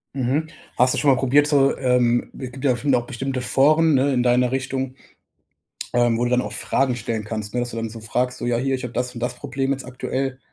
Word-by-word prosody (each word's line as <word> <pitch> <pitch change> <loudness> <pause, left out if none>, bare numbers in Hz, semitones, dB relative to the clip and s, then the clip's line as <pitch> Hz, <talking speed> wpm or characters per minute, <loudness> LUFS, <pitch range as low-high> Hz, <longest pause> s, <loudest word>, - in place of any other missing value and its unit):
Mhm, 135 +4 0 0.3
hast 125 +1 +4
du - - -1
schon 145 - +3
mal 130 - +3
probiert, 140 +3 +3
so 140 -2 +3
ähm 125 -2 +1
es 130 -2 -6
gibt 130 +1 -10
ja 130 -3 +3
noch 125 -4 +2
bestimmte 130 +1 -4
Foren, 155 +5 +3
ne, 135 +1 +2
in 125 -1 +1
deiner 125 0 +3
Richtung, 130 0 -3 1.0
ähm, 120 -1 +3
wo 120 - 0
du - - 0
dann 125 - +3
auch 105 -2 -6
Fragen 130 +4 0
stellen 110 -1 -3
kannst, 110 -1 -5
ne, 125 - 0
das 120 - -3
du - - -6
dann 115 0 -3
so 115 +1 -9
fragst 125 +3 -1
so: - - -4
„Ja, 120 -1 +1
hier, 135 +2 -1
ich 130 - -7
habe 125 -1 -6
das 125 +1 -2
und 120 - -7
das 125 +1 -2
Problem 135 0 -3
jetzt 135 -1 -3
aktuell“, 130 +1 -3
125 Hz, 245 wpm, -22 LUFS, 120-135 Hz, 1.0 s, hast